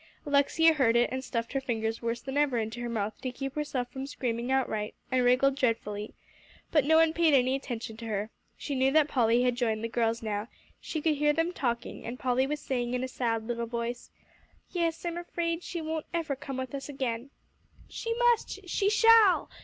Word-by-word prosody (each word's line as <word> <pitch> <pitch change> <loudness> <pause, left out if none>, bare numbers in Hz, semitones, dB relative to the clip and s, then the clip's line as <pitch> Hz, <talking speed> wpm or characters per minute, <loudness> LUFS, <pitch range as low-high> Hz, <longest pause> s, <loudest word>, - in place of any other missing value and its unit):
Alexia 290 +3 +4
heard 255 -6 +3
it, 240 0 +3
and 260 0 -3
stuffed 230 -2 -3
her 270 - 0
fingers 225 -3 -2
worse 235 0 -2
than 270 0 -6
ever 290 -4 +2
into 225 +1 -3
her 240 - -3
mouth 215 -2 -2
to 255 - -3
keep 270 +1 -5
herself 280 -4 -2
from 265 +1 -5
screaming 240 -2 -3
outright, 220 -5 0 0.2
and 255 -1 +3
wriggled 255 +2 +4
dreadfully. 225 -5 -1 0.6
But 300 -4 +3
no 320 +2 +4
one 325 0 +5
paid 330 -3 +4
any 255 0 +3
attention 240 -5 -4
to 230 0 -7
her. 210 0 -2 0.3
She 290 - -4
knew 265 0 +2
that 310 -1 +5
Polly 240 -3 +3
had 250 -1 +2
joined 225 -3 -1
the - - 0
girls 230 0 0
now; 210 0 -2 0.3
she 310 -2 -4
could 310 -3 +2
hear 295 +1 +3
them 330 +3 0
talking, 235 -7 -3
and 235 +2 -5
Polly 255 +1 +1
was 300 +1 -2
saying, 245 -3 -2
in 250 - -1
a - - -1
sad 230 -3 -2
little 235 0 -3
voice, 235 +1 -4 0.6
"Yes, 335 -1 -1
I'm 340 0 -2
afraid 340 -1 -2
she 345 -1 -5
won't 315 0 -3
ever 315 -4 -1
come 270 0 -6
with 260 0 -5
us 275 +1 -5
again." 260 -2 -3 0.6
"She 460 - -5
must, 470 -5 +1
she 395 +3 +1
shall!" 440 -2 +6
260 Hz, 205 wpm, -29 LUFS, 235-300 Hz, 0.6 s, shall